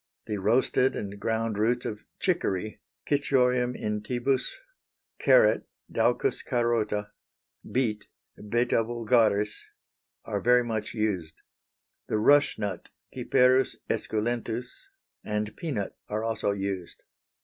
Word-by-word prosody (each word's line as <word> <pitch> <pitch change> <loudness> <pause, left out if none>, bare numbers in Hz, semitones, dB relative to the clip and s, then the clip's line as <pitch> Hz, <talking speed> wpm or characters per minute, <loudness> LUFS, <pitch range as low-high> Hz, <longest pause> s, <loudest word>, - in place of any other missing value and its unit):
The 105 - -3
roasted 125 +5 +2
and 100 0 -5
ground 110 -1 -1
roots 120 +3 +1
of 105 - -4 0.2
chicory 95 +3 -1 0.3
(Cichorium 125 -3 +2
intybus), 120 +5 -1 0.7
carrot - - +4 0.2
(Daucus 410 - +1
carota), 115 -4 0 0.6
beet 115 -5 0 0.4
(Beta 120 0 +2
vulgaris), 110 -3 +1 0.6
are - - -2
very 125 +1 +5
much 110 -3 -3
used. 95 -8 -2 0.6
The - - 0
rush 145 +7 +4
nut 105 -2 -4 0.2
(Cyperus 130 +1 +3 0.2
esculentus), 120 - -2 0.4
and 105 0 -3
peanut 135 - -3
are 105 +1 -2
also 115 -2 -1
used. 95 -3 -4
115 Hz, 100 wpm, -27 LUFS, 105-125 Hz, 0.7 s, very